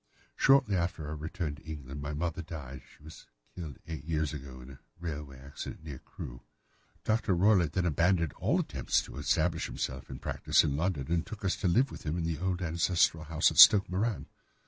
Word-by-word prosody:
Shortly 135 -7 +4
after 85 -3 -2
our 75 - -4
return 80 0 -4
to 75 - -13
England 70 -3 -7
my 70 +1 -4
mother 85 +2 -2
died—she 75 -4 -10
was 80 +1 -13 0.3
killed 80 -7 -7
eight 80 -2 -6
years 75 -2 -1
ago 65 -3 -8
in 65 +2 -11
a 65 - -13 0.2
railway 75 -5 -6
accident 70 +3 -8
near 70 -5 -7
Crewe. - - -9 0.6
Dr. 110 -4 +1
Roylott 90 -4 +3
then 90 -2 0
abandoned 85 0 +2
his - - +1
attempts - - 0
to - - -11
establish 80 +4 +1
himself 65 0 -5
in - - -6
practice - - +2
in 70 - 0
London 80 -2 -2
and 85 -1 +2
took 110 -2 -8
us 95 - +1
to 100 - -1
live 125 +10 +3
with - - -9
him 80 +2 -3
in 85 - -2
the 80 -2 -2
old 90 0 -1
ancestral 85 -1 +1
house 80 +1 +2
at - - -1
Stoke 100 -3 +9
Moran. 105 +3 -1
80 Hz, 195 wpm, -30 LUFS, 75-90 Hz, 0.6 s, Stoke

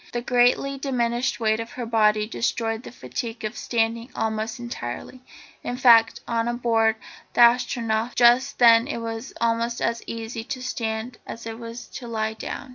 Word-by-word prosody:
The 240 - -1
greatly 250 +3 +2
diminished 245 -2 -1
weight 220 -1 +1
of 230 +1 -6
her 245 - -5
body 215 -2 +3
destroyed 225 0 -1
the - - -10
fatigue 225 - -6
of 215 - -4
standing 230 +1 -1
almost 220 0 -2
entirely. 240 - -6 0.4
In 245 - -3
fact, 230 -3 +5
on 235 +1 -1
board 225 -2 +2 0.4
the - - +4
Astronef 235 -1 +3
just 245 +2 +4
then 230 0 +6
it 295 - -3
was 230 +2 -5
almost 235 +1 0
as 230 0 -1
easy 225 0 -5
to 255 +1 -6
stand 225 -1 -3
as 230 - -8
it 225 0 -6
was 230 0 -8
to 240 - -8
lie 220 -1 -2
down. 240 +4 -7
230 Hz, 165 wpm, -24 LUFS, 225-240 Hz, 0.4 s, then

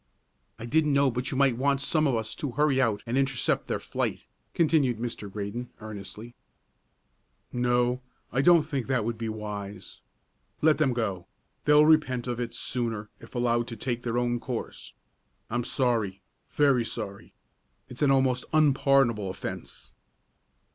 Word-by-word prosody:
"I 115 - -7
didn't 150 +3 +2
know 140 -1 +4
but 125 +2 -3
you 130 - -3
might 135 -4 +3
want 140 +1 +2
some 155 +2 +2
of 130 - +1
us 110 -1 -3
to 140 -5 -4
hurry 140 -1 +2
out 110 -5 0
and 120 +4 0
intercept 135 -2 0
their - - -1
flight," - - -3 0.3
continued 150 -8 +3
Mr. 115 -3 -5
Graydon, 105 +4 -5
earnestly. 105 +2 -9 1.2
"No, 125 0 +1 0.3
I 130 - +2
don't 170 +1 +6
think 140 -5 -3
that 130 -5 +1
would 115 -1 -3
be 115 -1 -2
wise. 105 -3 -7 0.6
Let 155 0 +3
them 135 -5 +3
go; 100 -7 -2 0.4
they'll 150 0 +6
repent 155 -6 +3
of 120 -1 -3
it 120 -1 -4
sooner 115 -4 -2
if - - -15
allowed 120 -1 +1
to 115 - -6
take 120 +1 -2
their 120 -1 -2
own 120 0 0
course. 120 -1 -6 0.6
I'm 120 +1 0
sorry, 115 -8 -1 0.3
very 140 -5 +3
sorry. 105 -3 -6 0.5
It's 125 - -9
an 145 - +4
almost 130 -2 +3
unpardonable 135 -8 +3
offence." 95 - -7
120 Hz, 155 wpm, -27 LUFS, 115-135 Hz, 1.2 s, don't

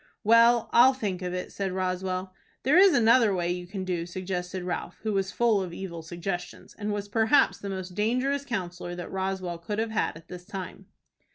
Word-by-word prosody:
"Well, 230 +1 +5
I'll 255 +3 +7
think 200 -7 -3
of 180 -1 -3
it," 180 0 -4
said 195 -1 -3
Roswell. 185 0 -2 0.3
"There 275 +5 +3
is 385 -2 +7
another 230 -3 +5
way 175 -1 0
you 180 0 -4
can 190 0 -5
do," 175 -2 -2
suggested 180 0 -4
Ralph, 180 0 -4
who 215 -1 -1
was 195 -1 0
full 225 -1 +2
of 180 -2 -5
evil 170 -3 -6
suggestions, 175 +2 -6
and 210 -1 -4
was 205 0 -3
perhaps 220 +6 +3
the 200 - -6
most 185 -1 -5
dangerous 255 +7 0
counsellor 180 -8 -4
that 175 -1 -7
Roswell 190 -2 -3
could 205 +5 -4
have 225 0 -1
had 215 - -1
at 165 0 -16
this 180 -1 -9
time. 190 -2 -8
190 Hz, 195 wpm, -27 LUFS, 180-220 Hz, 0.3 s, I'll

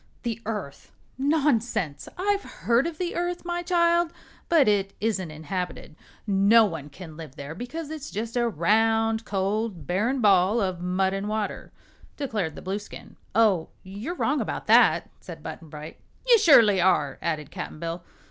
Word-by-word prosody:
"The 230 -2 -3
Earth? 205 -11 -5 0.3
Nonsense! 265 - 0
I've 400 +2 +1
heard 240 -3 0
of 335 -2 -6
the 355 0 -2
Earth, 350 0 -2
my 350 0 -2
child, 340 -1 +2 0.4
but 320 -7 +5
it 200 -2 +1
isn't 200 -6 -1
inhabited. 160 +1 -5 0.3
No 205 +3 +5
one 160 -7 -5
can 160 +1 -11
live 155 -5 -9
there 140 +1 -7
because 290 - -6
it's 305 -2 -6
just 225 +3 -5
a 240 -1 +2
round, 225 +4 +2
cold, 195 -3 -2
barren 215 - 0
ball 200 0 +4
of 185 -4 -2
mud 185 +1 0
and 195 +1 -3
water," 215 -1 -3 0.5
declared 210 - -2
the - - -10
Blueskin. 200 +2 -6 0.2
"Oh, 210 -7 +3
you're 205 - -6
wrong 295 -4 0
about - - -4
that," - - +5
said - - -10
Button 165 - -8
Bright. 150 +1 -9 0.3
"You 475 -2 +7
surely 220 - +6
are," 160 -7 +2
added 155 -4 -3
Cap'n - - -6
Bill. 170 +2 -5
210 Hz, 155 wpm, -26 LUFS, 180-260 Hz, 0.5 s, You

